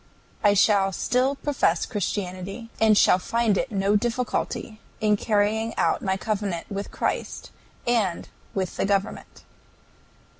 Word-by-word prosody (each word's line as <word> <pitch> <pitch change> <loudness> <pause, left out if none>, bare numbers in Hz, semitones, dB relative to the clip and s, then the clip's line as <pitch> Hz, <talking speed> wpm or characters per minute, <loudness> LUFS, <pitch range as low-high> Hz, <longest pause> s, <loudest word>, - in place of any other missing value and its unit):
I 205 -1 +5
shall 200 -1 +4
still 255 +8 +1
profess 270 - 0
Christianity, 195 +1 -4
and 220 -2 +5
shall 180 - +5
find 230 +2 +1
no 200 -1 +1
difficulty 230 -1 -2 0.2
in 215 -1 +3
carrying 215 +2 0
out - - +1
my 190 -2 0
covenant 200 -4 -2
with 200 0 -4
Christ - - -3 0.3
and 220 -8 0 0.3
with 190 -2 -2
the - - +1
government. 200 0 -2
205 Hz, 120 wpm, -25 LUFS, 195-230 Hz, 0.3 s, I